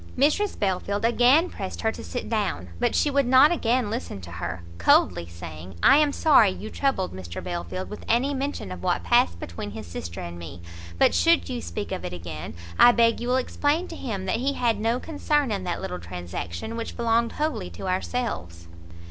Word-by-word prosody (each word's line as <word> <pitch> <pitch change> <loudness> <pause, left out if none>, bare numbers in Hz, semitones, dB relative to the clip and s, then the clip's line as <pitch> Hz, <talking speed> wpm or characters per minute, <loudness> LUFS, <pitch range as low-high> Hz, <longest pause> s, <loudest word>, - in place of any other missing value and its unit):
Mrs 310 +10 +2
Belfield 200 +1 -1
again 250 +8 +5
pressed 195 - -6
her 220 - +1
to - - -9
sit 245 - -5
down, 205 - -2
but - - +1
she 295 - +2
would 280 -2 +2
not 260 +5 +7
again 245 -8 +1
listen 230 - -4
to 85 -1 -10
her, 85 +1 -5 0.2
coldly 85 0 +3
saying 85 +1 -9
"I - - +8
am 300 -1 +4
sorry 280 -9 +5
you 215 +3 -6
troubled 265 -10 0
Mr 90 -2 -7
Belfield 180 +1 -4
with 210 - -8
any 260 +5 +2
mention 275 - -3
of 90 -1 -7
what - - 0
passed 85 -1 +3
between 85 +5 -6
his 105 +1 -8
sister 85 0 -7
and 85 0 -7
me, 85 0 -9 0.3
but - - +4
should 85 0 +3
you - - -3
speak 85 0 -5
of - - -3
it 90 - -5
again, 85 -1 -7 0.2
I 245 - +9
beg 230 -1 +3
you 240 - -4
will 250 - +2
explain 290 +6 0
to 330 - -7
him 205 -11 -4
that 190 - 0
he 270 +4 0
had 235 -5 +1
no 230 +3 +1
concern 295 -4 0
in 195 -3 -2
that 175 - -2
little 90 0 -4
transaction, 90 - -6
which 230 0 -5
belonged 235 0 +1
wholly 300 - -2
to 85 - -7
ourselves." 185 - -3
205 Hz, 200 wpm, -25 LUFS, -, 0.3 s, I